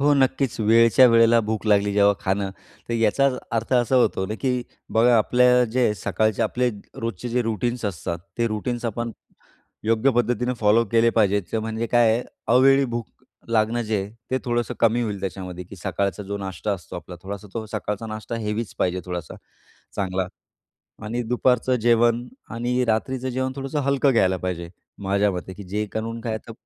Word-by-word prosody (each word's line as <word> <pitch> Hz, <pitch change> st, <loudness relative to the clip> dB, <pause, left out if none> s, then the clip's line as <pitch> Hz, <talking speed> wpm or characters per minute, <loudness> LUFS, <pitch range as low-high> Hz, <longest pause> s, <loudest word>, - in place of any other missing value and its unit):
हो 145 Hz, +1 st, +4 dB
नक्कीच, 130 Hz, -1 st, +1 dB
वेळच्या 115 Hz, +4 st, +6 dB
वेळेला 115 Hz, 0 st, +5 dB
भूक 110 Hz, 0 st, -3 dB
लागली, 100 Hz, -1 st, +3 dB
जेव्हा 100 Hz, 0 st, +4 dB
खाणं, 95 Hz, +1 st, -1 dB, 0.4 s
तर 120 Hz, -, -1 dB
याचा 115 Hz, +5 st, +3 dB, 0.3 s
अर्थ 115 Hz, +3 st, -2 dB
असा 125 Hz, +1 st, +3 dB
होतो 120 Hz, -6 st, +2 dB
ना, 105 Hz, -, -4 dB
की 125 Hz, -2 st, 0 dB, 0.3 s
बघा, 120 Hz, +2 st, +5 dB
आपल्या 125 Hz, +2 st, +4 dB
जे 120 Hz, -3 st, +2 dB
सकाळचे 105 Hz, +2 st, 0 dB
आपले 125 Hz, 0 st, +1 dB, 0.3 s
रोजचे 115 Hz, +1 st, -4 dB
जे 125 Hz, +1 st, +1 dB
रूटीन्स 115 Hz, +2 st, -2 dB
असतात, 85 Hz, -3 st, -3 dB, 0.2 s
ते 115 Hz, -, +2 dB
रूटीन्स 115 Hz, +3 st, -3 dB
आपण 115 Hz, +1 st, -3 dB, 0.7 s
योग्य 115 Hz, +4 st, +3 dB
पद्धतीनं 125 Hz, 0 st, 0 dB
फॉलो 110 Hz, +2 st, +4 dB
केले 115 Hz, 0 st, +4 dB
पाहिजेत, 100 Hz, -2 st, +1 dB
म्हणजे 110 Hz, +1 st, -3 dB
काय 120 Hz, -1 st, +4 dB
आहे, 120 Hz, +2 st, 0 dB, 0.3 s
अवेळी 135 Hz, +2 st, +6 dB
भूक 120 Hz, -3 st, -3 dB, 0.4 s
लागणं 115 Hz, +1 st, +1 dB
जे 110 Hz, -1 st, -1 dB
आहे, 100 Hz, +1 st, -6 dB, 0.2 s
ते 130 Hz, -, +1 dB
थोडंसं 120 Hz, -1 st, -1 dB
कमी 115 Hz, +1 st, +3 dB
होईल. 105 Hz, -4 st, -3 dB
त्याच्यामध्ये, 90 Hz, -2 st, -5 dB
की 95 Hz, +3 st, -12 dB
सकाळचा 95 Hz, +2 st, -2 dB
जो 100 Hz, +1 st, -4 dB
नाश्ता 95 Hz, +1 st, -3 dB
असतो 90 Hz, -3 st, -7 dB
आपला, 90 Hz, +1 st, -9 dB
थोडासा 100 Hz, +1 st, -7 dB
तो 115 Hz, -1 st, -3 dB
सकाळचा 105 Hz, 0 st, -3 dB
नाश्ता 110 Hz, +2 st, -5 dB
हेवीच 105 Hz, 0 st, -3 dB
पाहिजे, 90 Hz, 0 st, 0 dB
थोडासा 90 Hz, -3 st, -5 dB, 0.6 s
चांगला. 95 Hz, -1 st, -1 dB, 0.8 s
आणि 120 Hz, +3 st, -2 dB
दुपारचं 125 Hz, +1 st, +1 dB
जेवण 120 Hz, +1 st, +3 dB, 0.2 s
आणि 125 Hz, +2 st, 0 dB
रात्रीचं 125 Hz, +3 st, -1 dB
जेवण 130 Hz, +1 st, -2 dB
थोडंसं 135 Hz, +2 st, -2 dB
हलकं 140 Hz, 0 st, +2 dB
घ्यायला 95 Hz, -6 st, +3 dB
पाहिजे, 85 Hz, -2 st, -3 dB, 0.4 s
माझ्या 100 Hz, +1 st, +2 dB
मते, 90 Hz, +1 st, -6 dB
की 100 Hz, -, -10 dB
जे 105 Hz, +3 st, -2 dB
करून 115 Hz, +1 st, -4 dB
काय, 110 Hz, -1 st, -3 dB
तर 115 Hz, -, -11 dB
115 Hz, 170 wpm, -23 LUFS, 100-120 Hz, 0.8 s, वेळच्या